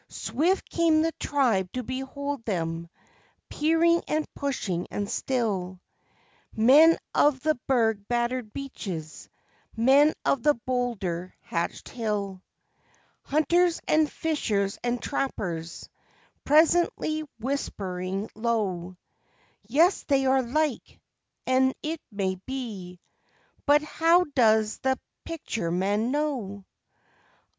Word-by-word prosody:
Swift 355 Hz, +7 st, -1 dB
came 325 Hz, -2 st, +3 dB
the 330 Hz, -, +1 dB
tribe 225 Hz, -10 st, +1 dB
to 255 Hz, -, -4 dB
behold 265 Hz, +2 st, -4 dB
them, 165 Hz, -5 st, -3 dB, 0.6 s
peering 330 Hz, +2 st, +3 dB
and 310 Hz, 0 st, 0 dB
pushing 215 Hz, -, -2 dB
and 205 Hz, -1 st, -3 dB
still 200 Hz, -8 st, -2 dB, 0.8 s
Men 290 Hz, +9 st, +7 dB, 0.2 s
of 290 Hz, -3 st, +3 dB
the 310 Hz, 0 st, +2 dB
berg 225 Hz, -6 st, +1 dB
battered 240 Hz, -1 st, -1 dB
beaches, 190 Hz, -, -7 dB, 0.5 s
men 275 Hz, +6 st, +5 dB
of 275 Hz, -, +2 dB
the 295 Hz, +3 st, +4 dB
boulder 225 Hz, -8 st, -3 dB
hatched 170 Hz, 0 st, -3 dB
hill, 205 Hz, -5 st, -3 dB, 0.8 s
Hunters 340 Hz, +4 st, +2 dB
and 310 Hz, -1 st, +3 dB
fishers 210 Hz, -11 st, -1 dB
and 245 Hz, 0 st, 0 dB
trappers 175 Hz, -, -3 dB, 0.6 s
presently 310 Hz, 0 st, +3 dB, 0.2 s
whispering 195 Hz, -6 st, -3 dB
low; 195 Hz, -6 st, -2 dB, 0.7 s
"Yea, 320 Hz, -, +5 dB, 0.2 s
they 275 Hz, -2 st, +2 dB
are 265 Hz, 0 st, +4 dB
like 270 Hz, +2 st, -2 dB, 0.5 s
and 260 Hz, +1 st, +3 dB
it 315 Hz, +1 st, -3 dB
may 190 Hz, -2 st, -2 dB
be.... 210 Hz, -9 st, -6 dB, 0.7 s
But 295 Hz, +1 st, +5 dB
how 330 Hz, +3 st, +3 dB
does 220 Hz, -4 st, +3 dB
the 265 Hz, 0 st, +1 dB, 0.3 s
Picture 285 Hz, -, -4 dB
man 200 Hz, +6 st, 0 dB
know? 255 Hz, -9 st, -2 dB
245 Hz, 100 wpm, -26 LUFS, 200-295 Hz, 0.8 s, Men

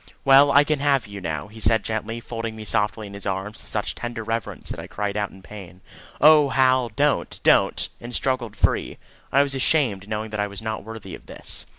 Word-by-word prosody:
"Well, 140 Hz, +1 st, +7 dB
I 145 Hz, +1 st, +6 dB
can 150 Hz, -1 st, 0 dB
have 140 Hz, -2 st, +2 dB
you 100 Hz, -1 st, -9 dB
now," 80 Hz, -2 st, -4 dB
he 110 Hz, +1 st, -13 dB
said 110 Hz, 0 st, +3 dB
gently, 110 Hz, +1 st, -3 dB
folding 115 Hz, -1 st, -5 dB
me 110 Hz, -1 st, -8 dB
softly 105 Hz, 0 st, 0 dB
in 100 Hz, -, -10 dB
his 100 Hz, 0 st, -6 dB
arms 95 Hz, +2 st, -3 dB
with -, -, -14 dB
such 105 Hz, -, -2 dB
tender 120 Hz, -1 st, -5 dB
reverence 115 Hz, 0 st, -4 dB
that -, -, -5 dB
I -, -, -7 dB
cried 105 Hz, -1 st, -3 dB
out 105 Hz, -1 st, -1 dB
in 95 Hz, -, -16 dB
pain, 95 Hz, -4 st, -11 dB, 0.4 s
"Oh, 150 Hz, -1 st, +7 dB
Hal, 130 Hz, -2 st, +3 dB
don't, 125 Hz, -, 0 dB
don't!" -, -, +3 dB
and 120 Hz, +1 st, -7 dB
struggled 125 Hz, -5 st, -1 dB
free. -, -, 0 dB, 0.3 s
I 140 Hz, +1 st, +5 dB
was 140 Hz, -1 st, -2 dB
ashamed, 130 Hz, -8 st, +1 dB
knowing 110 Hz, 0 st, -4 dB
I 105 Hz, -1 st, -1 dB
was 100 Hz, +1 st, -8 dB
not 110 Hz, -1 st, -4 dB
worthy 110 Hz, 0 st, -9 dB
of -, -, -11 dB
this. -, -, -4 dB
110 Hz, 215 wpm, -23 LUFS, 105-130 Hz, 0.4 s, Well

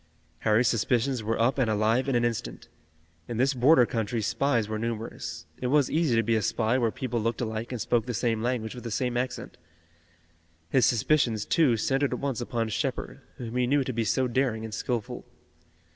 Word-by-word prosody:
Harry's 110 Hz, +3 st, +3 dB
suspicions 120 Hz, +3 st, +1 dB
were 110 Hz, +1 st, -2 dB
up 125 Hz, +4 st, +2 dB
and 120 Hz, -4 st, +2 dB
alive 110 Hz, +5 st, +1 dB
in 135 Hz, -, +1 dB
an 120 Hz, 0 st, +2 dB
instant. 105 Hz, -, -4 dB, 0.6 s
In 120 Hz, -, -4 dB
this 135 Hz, +3 st, +2 dB
border 130 Hz, +1 st, +5 dB
country 115 Hz, 0 st, -2 dB
spies 120 Hz, 0 st, 0 dB
were 110 Hz, 0 st, -3 dB
numerous. 115 Hz, +1 st, -5 dB, 0.2 s
It 125 Hz, -, -1 dB
was 140 Hz, 0 st, +3 dB
easy 155 Hz, -7 st, +2 dB
to 115 Hz, -, +3 dB
be 115 Hz, +1 st, +1 dB
a 110 Hz, -, +1 dB
spy 115 Hz, +3 st, +1 dB
where 115 Hz, -2 st, +2 dB
people 120 Hz, -1 st, -3 dB
looked 115 Hz, +1 st, -1 dB
alike 110 Hz, 0 st, -3 dB
and 125 Hz, -, -4 dB
spoke 115 Hz, +1 st, 0 dB
the 125 Hz, -, -2 dB
same 115 Hz, -1 st, 0 dB
language 120 Hz, -2 st, -2 dB
with 125 Hz, -, -9 dB
the 120 Hz, -, -4 dB
same 125 Hz, +2 st, -1 dB
accent. 125 Hz, +1 st, -3 dB, 1.1 s
His 130 Hz, -, +4 dB
suspicions, 120 Hz, -2 st, +2 dB
too, 140 Hz, -9 st, +3 dB
centered 135 Hz, +5 st, 0 dB
at -, -, -3 dB
once 135 Hz, -4 st, -2 dB
upon 115 Hz, -2 st, -2 dB
Shepard, 105 Hz, -, -3 dB, 0.2 s
whom 120 Hz, -1 st, -6 dB
he 125 Hz, -1 st, +1 dB
knew 140 Hz, +1 st, +2 dB
to 130 Hz, -, -4 dB
be 115 Hz, 0 st, 0 dB
so 125 Hz, +5 st, +1 dB
daring 120 Hz, -3 st, 0 dB
and 110 Hz, -, -7 dB
skillful. 115 Hz, 0 st, -3 dB
120 Hz, 200 wpm, -27 LUFS, 110-130 Hz, 1.1 s, border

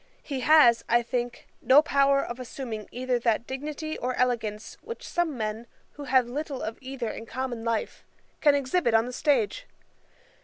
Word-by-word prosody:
He 275 Hz, -3 st, -4 dB
has, 255 Hz, -4 st, +6 dB
I 240 Hz, 0 st, +4 dB
think, 240 Hz, 0 st, -3 dB, 0.2 s
no 265 Hz, +5 st, +6 dB
power 275 Hz, -2 st, +3 dB
of 240 Hz, +1 st, -6 dB
assuming 235 Hz, -4 st, -6 dB
either 250 Hz, 0 st, -1 dB
that 230 Hz, -1 st, +1 dB
dignity 300 Hz, +4 st, -5 dB
or 250 Hz, +1 st, -2 dB
elegance 225 Hz, -4 st, -1 dB
which 465 Hz, -, -8 dB
some 340 Hz, -6 st, -1 dB
men, 220 Hz, +1 st, -4 dB, 0.2 s
who 290 Hz, -, -9 dB
have 260 Hz, -2 st, +4 dB
little 280 Hz, +1 st, -4 dB
of 220 Hz, +1 st, -5 dB
either 260 Hz, -3 st, -4 dB
in 225 Hz, -, -8 dB
common 250 Hz, -2 st, -4 dB
life, 230 Hz, -2 st, -2 dB, 0.4 s
can 290 Hz, -2 st, +5 dB
exhibit 270 Hz, -2 st, +1 dB
on 225 Hz, +1 st, +4 dB
the 250 Hz, -, -6 dB
stage. 290 Hz, -, 0 dB
255 Hz, 165 wpm, -27 LUFS, 235-280 Hz, 0.4 s, has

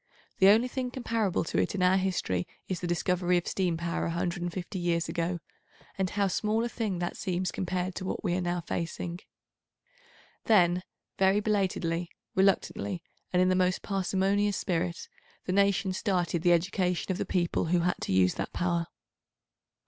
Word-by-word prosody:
The 190 Hz, -, +7 dB
only 220 Hz, +5 st, +6 dB
thing 255 Hz, 0 st, -3 dB
comparable 230 Hz, -6 st, 0 dB
to -, -, -1 dB
it -, -, 0 dB
in 185 Hz, -, 0 dB
our 185 Hz, +1 st, +5 dB
history 180 Hz, -, -1 dB, 0.2 s
is 185 Hz, -2 st, -2 dB
the 180 Hz, -, -3 dB
discovery 180 Hz, +1 st, +1 dB
of 175 Hz, -, -2 dB
steam 180 Hz, -4 st, 0 dB
power 170 Hz, 0 st, -2 dB
150 175 Hz, +2 st, -3 dB
years 170 Hz, -1 st, 0 dB
ago, 170 Hz, +1 st, -1 dB, 0.6 s
and 190 Hz, -1 st, 0 dB
how 200 Hz, +1 st, +1 dB
small 215 Hz, +4 st, 0 dB
a 240 Hz, -, -1 dB
thing 215 Hz, -5 st, -2 dB
that 175 Hz, +1 st, -3 dB
seems 185 Hz, -1 st, -2 dB
compared 185 Hz, 0 st, -2 dB
to 185 Hz, -, -5 dB
what -, -, -3 dB
we 180 Hz, -4 st, +1 dB
are 180 Hz, -, 0 dB
now 175 Hz, 0 st, -1 dB
facing. 170 Hz, +1 st, -4 dB, 1.3 s
Then 180 Hz, -5 st, +4 dB, 0.4 s
very 195 Hz, +1 st, +4 dB
belatedly, 185 Hz, -5 st, 0 dB, 0.2 s
reluctantly, 190 Hz, -1 st, +1 dB, 0.3 s
and 180 Hz, 0 st, +4 dB
in 185 Hz, -, +3 dB
the 185 Hz, -, +3 dB
most 185 Hz, 0 st, +1 dB
parsimonious 195 Hz, +1 st, +1 dB
spirit, 175 Hz, -2 st, -2 dB, 0.4 s
the 185 Hz, -, -1 dB
nations 195 Hz, -1 st, +2 dB
started 175 Hz, -5 st, 0 dB
the 175 Hz, 0 st, +4 dB
education 180 Hz, +1 st, 0 dB
of 185 Hz, -, -2 dB
the -, -, +1 dB
people 175 Hz, -2 st, 0 dB
who 170 Hz, +1 st, +2 dB
had 180 Hz, +1 st, +1 dB
to -, -, -2 dB
use 95 Hz, -1 st, +4 dB
that -, -, -4 dB
power. 170 Hz, -1 st, 0 dB
180 Hz, 170 wpm, -29 LUFS, 175-195 Hz, 1.3 s, The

